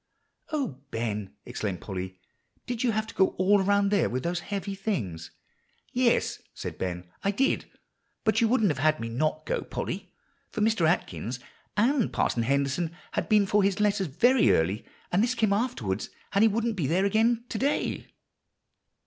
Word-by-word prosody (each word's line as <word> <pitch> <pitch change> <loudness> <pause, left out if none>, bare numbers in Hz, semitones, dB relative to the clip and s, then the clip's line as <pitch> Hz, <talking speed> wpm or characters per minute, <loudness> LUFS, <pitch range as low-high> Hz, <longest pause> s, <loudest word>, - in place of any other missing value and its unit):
"O 265 - -2
Ben!" 105 - -3
exclaimed 95 -5 -3
Polly, 95 -1 -6 0.5
"did 245 -2 -3
you 245 - +3
have 220 0 0
to - - -10
go 190 - +2
all 195 +2 +4
around 200 +1 +3
there 200 -5 +3
with 130 +1 -2
those 175 +1 -1
heavy 200 +2 -4
things?" 120 - -3 0.6
"Yes," 245 -1 +2
said - - -6
Ben, 90 -1 -3 0.2
"I 195 - +2
did. 265 +7 +1 0.6
But 220 0 +3
you 230 - +5
wouldn't 220 -5 +3
have 140 - -4
had 155 +2 +3
me 115 - -4
not 155 +6 -1
go, - - -1
Polly; 190 0 -5 0.4
for 215 - -4
Mr. 210 -6 +3
Atkins 130 - -1 0.4
said 245 +2 +3
Parson 120 - +1
Henderson 140 +7 0 0.2
had - - -2
been 210 -2 +5
for 205 +2 +3
his 195 0 +1
letters 205 -2 +2
very 245 - +4
early, 95 +7 0 0.2
and 180 - +3
this 245 +2 +1
came 220 -4 +2
afterwards, 170 - -1 0.2
and 200 - +3
he 225 - +7
wouldn't 225 0 0
be 155 -7 0
there 185 +6 +2
again 225 +3 +2
to 215 - -3
day." 280 +3 0
195 Hz, 175 wpm, -28 LUFS, 130-220 Hz, 0.6 s, he